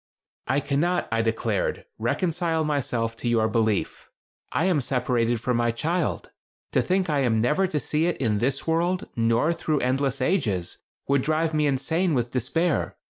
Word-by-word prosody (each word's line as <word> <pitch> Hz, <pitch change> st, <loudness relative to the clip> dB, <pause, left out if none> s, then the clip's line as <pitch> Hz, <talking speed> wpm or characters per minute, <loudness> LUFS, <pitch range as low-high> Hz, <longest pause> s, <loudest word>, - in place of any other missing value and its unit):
"I 140 Hz, +2 st, +1 dB
cannot," 170 Hz, +7 st, 0 dB
I 115 Hz, 0 st, +2 dB
declared, 115 Hz, -, -1 dB
"reconcile 165 Hz, -2 st, 0 dB
myself 125 Hz, -6 st, -1 dB
to 120 Hz, -, -4 dB
your 115 Hz, -2 st, +3 dB
belief. 110 Hz, -2 st, -1 dB, 0.4 s
I 170 Hz, -, +1 dB
am 175 Hz, -6 st, +2 dB
separated 120 Hz, -2 st, 0 dB
from 125 Hz, +1 st, 0 dB
my 120 Hz, 0 st, +2 dB
child. 155 Hz, -, -1 dB, 0.4 s
To -, -, +3 dB
think 185 Hz, 0 st, 0 dB
I 150 Hz, -3 st, +1 dB
am 120 Hz, -5 st, +2 dB
never 150 Hz, +12 st, +2 dB
to 155 Hz, -4 st, -1 dB
see 155 Hz, +5 st, 0 dB
it 175 Hz, -, -1 dB
in 110 Hz, -5 st, 0 dB
this 130 Hz, +4 st, -1 dB
world, 170 Hz, +3 st, 0 dB
nor 115 Hz, +7 st, +2 dB
through 155 Hz, -3 st, -1 dB
endless 135 Hz, +1 st, 0 dB
ages, 115 Hz, -, 0 dB, 0.3 s
would 140 Hz, -1 st, +3 dB
drive 155 Hz, +3 st, 0 dB
me 150 Hz, -1 st, +2 dB
insane 160 Hz, +5 st, +1 dB
with 120 Hz, -1 st, -1 dB
despair. 150 Hz, +7 st, 0 dB
140 Hz, 165 wpm, -25 LUFS, 120-165 Hz, 0.4 s, your